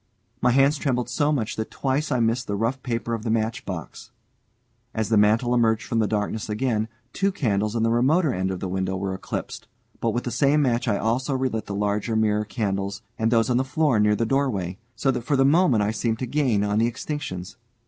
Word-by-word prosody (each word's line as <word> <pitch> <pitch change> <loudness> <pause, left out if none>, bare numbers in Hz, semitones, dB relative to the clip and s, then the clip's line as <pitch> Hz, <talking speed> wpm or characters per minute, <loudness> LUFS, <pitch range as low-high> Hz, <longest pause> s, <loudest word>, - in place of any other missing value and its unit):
My 125 - +4
hands 135 +4 +4
trembled 125 -4 -1
so 145 +4 +1
much 120 -8 -1
that 110 - -3
twice 140 +3 -1
I 125 - +2
missed 115 +2 +1
the 100 - -1
rough 115 +6 -1
paper 115 -2 -2
of 115 - -2
the 115 - -3
matchbox. 110 - -3 0.9
As 110 -1 -1
the 110 - +3
mantel 110 +4 +3
emerged 115 -2 +2
from 115 - -1
darkness 105 0 -1
again, 110 0 0 0.3
two 195 +1 +1
candles 105 - 0
in 115 - +1
the 115 - +2
remoter 140 +6 +3
end 95 +1 -1
of 95 -1 -4
the 95 - -2
window 95 +1 -2
were 95 0 -2
eclipsed. 95 - -6 0.3
But 115 - 0
with 120 +2 -1
the 120 - -3
same 140 +4 +3
match 120 -1 0
I 105 -3 +2
also 130 +6 0
relit 130 -5 -2
the 100 - -4
larger 105 +2 -1
mirror 105 -1 +2
candles, 100 -2 -3 0.2
and 110 0 +2
those 115 0 +2
on 120 - +3
the 130 - +2
floor 135 -2 +1
near 105 0 +4
the 115 - 0
doorway, 110 -8 -1 0.2
so 135 - +1
that 125 -2 -2
for 140 +5 0
the 135 0 +4
moment 140 - +4
I 105 - +1
seemed 110 +1 -1
to 130 - -3
gain 125 -6 +1
on 105 +1 +1
the 115 - +3
extinctions. 115 - -5
115 Hz, 220 wpm, -24 LUFS, 105-130 Hz, 0.9 s, My